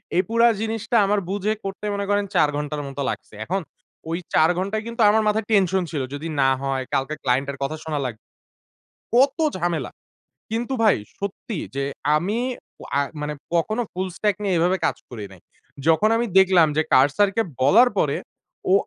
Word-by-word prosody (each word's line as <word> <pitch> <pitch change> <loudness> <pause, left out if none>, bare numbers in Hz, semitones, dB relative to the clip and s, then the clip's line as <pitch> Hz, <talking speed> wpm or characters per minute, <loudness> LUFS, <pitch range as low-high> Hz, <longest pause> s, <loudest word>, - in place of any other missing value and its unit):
এই 180 - +4
পুরা 230 +1 +5
জিনিসটা 225 +1 -2
আমার 205 +1 +2
বুঝে 205 +2 -1
করতে 195 +2 -5
মনে 200 0 -2
করেন, 205 0 +2
৪ 150 - +4
ঘন্টার 150 0 -3
মতো 135 +1 -5
লাগছে। - - -6
এখন 190 +3 -1 0.5
ওই 165 - -1 0.2
৪ 155 - +5
ঘন্টায় 200 +4 -2
কিন্তু 235 0 -3
আমার 220 +1 +3
মাথায় 210 0 +1
টেনশন 190 -3 +3
ছিল। 150 -4 -2
যদি 145 +3 -5
না 135 - +4
হয়? 135 -1 -1
কালকে 135 +3 0
ক্লায়েন্টের 135 +2 0
এর - - -19
কথা 145 +3 -2
শোনা 155 -2 -2
লাগ 125 - -2 1.0
কত 270 +4 +4 0.2
ঝামেলা। 170 -6 -2 0.6
কিন্তু 235 +4 -2
ভাই 215 - +5 0.2
সত্যি 200 +1 -5 0.2
যে 140 - -1 0.3
আমি 195 +9 0 0.4
ও - - -9
আ - - +4 0.2
মানে 150 0 -2 0.2
কখনো 215 +8 +1
ফুল 185 +1 -2
স্ট্যাক 210 -2 +1
নিয়ে 195 -2 +1
এভাবে 180 +3 +2
কাজ - - 0
করি 110 -4 -7
নাই। 95 -3 -15 0.5
যখন 165 +7 +4
আমি 235 - 0
দেখলাম 185 -4 +6
যে - - +5
Cursor 145 +10 +5
কে 225 - +3 0.2
বলার 220 - +6
পরে - - +1 0.5
ও - - +6
190 Hz, 180 wpm, -23 LUFS, 150-215 Hz, 1.0 s, দেখলাম